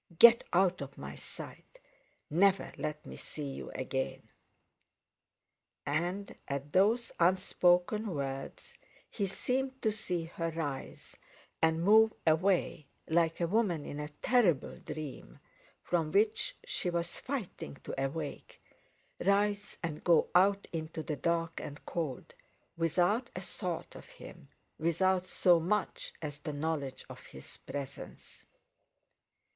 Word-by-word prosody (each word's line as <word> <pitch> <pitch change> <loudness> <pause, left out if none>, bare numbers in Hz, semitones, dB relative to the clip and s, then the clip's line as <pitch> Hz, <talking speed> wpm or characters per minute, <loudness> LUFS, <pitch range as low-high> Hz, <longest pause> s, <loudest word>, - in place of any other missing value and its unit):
Get 235 +3 +9
out 180 -1 +3
of 140 0 -7
my - - -6
sight; - - -10 0.5
never 190 +5 +3
let 150 0 -4
me - - -8
see 145 -3 -6
you - - -7
again!" 130 0 -3 1.6
And, 175 +7 -1
at 140 +1 -4
those 220 +6 +3
unspoken 180 +3 +3
words, 135 -1 -5 0.3
he 200 -3 -1
seemed 260 +6 -1
to 220 - +3
see 180 -5 -2
her 165 0 -3
rise 150 -5 -5 0.5
and 160 +1 +3
move 220 +3 +6
away, 170 -2 +2 0.2
like 165 0 +2
a 170 - +2
woman 180 -6 +1
in 145 - -5
a 150 - -3 0.2
terrible 195 - +3
dream, 145 - -7 0.5
from 165 -3 0
which 215 - +2
she 180 - -1
was 170 0 -2
fighting 250 - -5
to 135 - -3
awake—rise 200 +7 -3
and 155 -3 -4
go 170 -3 +4
out 195 +2 +4
into 160 -1 -4
the 150 - -2
dark 165 +2 0
and 145 - -8
cold, 155 -8 -4 0.4
without 175 - +2
a 180 - -4
thought 180 -2 -4
of - - -11
him, - - -12 0.3
without 185 +3 +2
so 175 -2 +4
much 195 +5 -1
as 145 -1 -5
the 150 +1 -5
knowledge 145 -3 -3
of - - -11
his 65 - -11
presence. 140 -2 -8
170 Hz, 125 wpm, -32 LUFS, 150-195 Hz, 1.6 s, Get